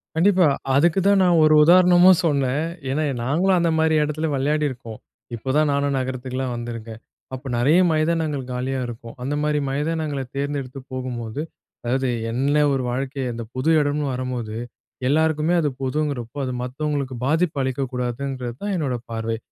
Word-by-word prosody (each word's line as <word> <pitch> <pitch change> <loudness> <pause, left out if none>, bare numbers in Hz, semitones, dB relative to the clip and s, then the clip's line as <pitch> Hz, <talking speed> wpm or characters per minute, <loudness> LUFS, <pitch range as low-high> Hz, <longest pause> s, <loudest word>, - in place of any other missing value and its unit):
கண்டிப்பா. 180 +1 +4 0.3
அதுக்கு 170 +6 +3
தான் 200 -1 +5
நான் 175 -2 +4
ஒரு 155 0 +5
உதாரணமும் 180 +2 +6
சொன்னேன். 140 -1 +1 0.3
ஏன்னா 150 +4 0 0.2
நாங்களும் 175 +9 +2
அந்த 170 -1 +2
மாதிரி 160 0 +3
இடத்துல 150 +2 -2
விளையாடியிருக்கோம். 135 -5 -1 0.4
இப்போதான் 135 +6 +1
நானும் 140 0 0
நகரத்துக்குலாம் 130 0 -3
வந்துருக்கேன். 115 -2 -7 0.3
அப்போ 130 +1 -6
நெறைய 145 +9 +4
மைதானங்கள் 155 -3 0
காலியா 130 +2 -2
இருக்கும். 115 0 -9
அந்த 135 +3 -2
மாரி 150 0 +1
மைதானங்கள 150 0 -2
தேர்ந்தெடுத்து 140 -2 -3
போகும்போது, 125 -1 -4 0.4
அதாவது 130 +2 0 0.2
என்ன 135 +5 0 0.2
ஒரு 135 -1 -1
வாழ்க்கை, 135 +2 -3
அந்த 115 0 -5
பொது 130 +5 0
இடம்னு 145 +1 0
வரம்போது, 125 -4 -4 0.5
எல்லாருக்குமே 160 +3 +2
அது 150 - +1
பொதுங்கிறப்போ, 135 -2 -2
அது 130 - -3
மத்தவங்களுக்கு 140 0 -3
பாதிப்பு 160 +2 +1
அளிக்கக்கூடாதுங்கிறது 130 -1 -3
தான், 205 -1 -1
என்னோட 140 -6 -1 0.2
பார்வை. 115 0 -2
140 Hz, 140 wpm, -22 LUFS, 125-155 Hz, 0.5 s, உதாரணமும்